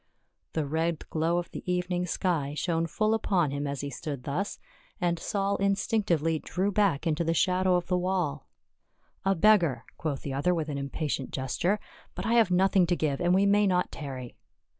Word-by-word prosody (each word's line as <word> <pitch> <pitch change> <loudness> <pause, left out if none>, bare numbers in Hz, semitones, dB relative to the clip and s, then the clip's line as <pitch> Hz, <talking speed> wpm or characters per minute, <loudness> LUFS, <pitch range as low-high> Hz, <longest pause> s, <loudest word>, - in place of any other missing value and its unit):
The 160 -2 0
red 160 +2 -1
glow 165 +2 +1
of 175 - -3
the - - -6
evening 180 0 -1
sky 160 -5 -1
shone 165 0 0
full 215 +6 +1
upon 185 -9 +1
him 145 +1 -2
as 140 -1 -3
he 140 0 -4
stood 140 -5 -5
thus, 180 +10 -2 0.4
and 175 -2 0
Saul 200 -1 -1
instinctively 195 -5 +1
drew 190 +6 -1
back 195 -8 +2
into 160 0 +1
the 165 0 0
shadow 185 +1 +3
of 175 - 0
the 180 0 +1
wall. 180 -6 -1 0.4
" - - -40
A - - +2
beggar 170 - +4
!" - - -38
quoth 145 -4 -3
the 140 - -4
other 175 +7 +1
with 160 -2 -2
an 140 -1 -3
impatient 140 0 -3
ges 130 -1 -3
ture. 200 +4 +1 0.2
" - - -26
But - - -4
I 230 - +1
have 230 -5 +5
nothing 185 0 +4
to 175 - +2
give, 145 -4 -1
and 175 - +2
we 195 +1 +4
may 205 +1 +4
not 180 -1 +1
tarry." 130 -5 -7
175 Hz, 205 wpm, -28 LUFS, 150-190 Hz, 0.4 s, have